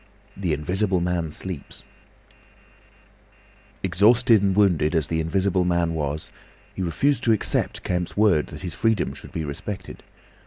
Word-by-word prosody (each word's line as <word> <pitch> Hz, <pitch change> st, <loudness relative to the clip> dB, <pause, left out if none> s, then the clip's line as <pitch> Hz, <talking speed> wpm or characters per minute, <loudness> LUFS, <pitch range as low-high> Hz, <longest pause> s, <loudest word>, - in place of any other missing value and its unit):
THE 95 Hz, -4 st, -2 dB
INVISIBLE 90 Hz, +6 st, 0 dB
MAN 85 Hz, -2 st, -1 dB
SLEEPS 85 Hz, -1 st, -7 dB, 2.0 s
Exhausted 110 Hz, +5 st, +4 dB
and 100 Hz, -2 st, +1 dB
wounded 90 Hz, -6 st, +3 dB
as 75 Hz, -3 st, 0 dB
the 80 Hz, -, 0 dB
Invisible 95 Hz, +3 st, +1 dB
Man 85 Hz, -1 st, +1 dB
was, 75 Hz, -1 st, -3 dB, 0.4 s
he -, -, -5 dB
refused 135 Hz, -, +1 dB
to 115 Hz, -, +5 dB
accept 110 Hz, -, -1 dB
Kemp's 90 Hz, +1 st, -2 dB
word 100 Hz, -8 st, +3 dB
that 75 Hz, -, -9 dB
his 90 Hz, -, -4 dB
freedom 110 Hz, -4 st, 0 dB
should -, -, -11 dB
be 80 Hz, -, -3 dB
respected. 75 Hz, +8 st, -6 dB
90 Hz, 140 wpm, -24 LUFS, 80-100 Hz, 2.0 s, to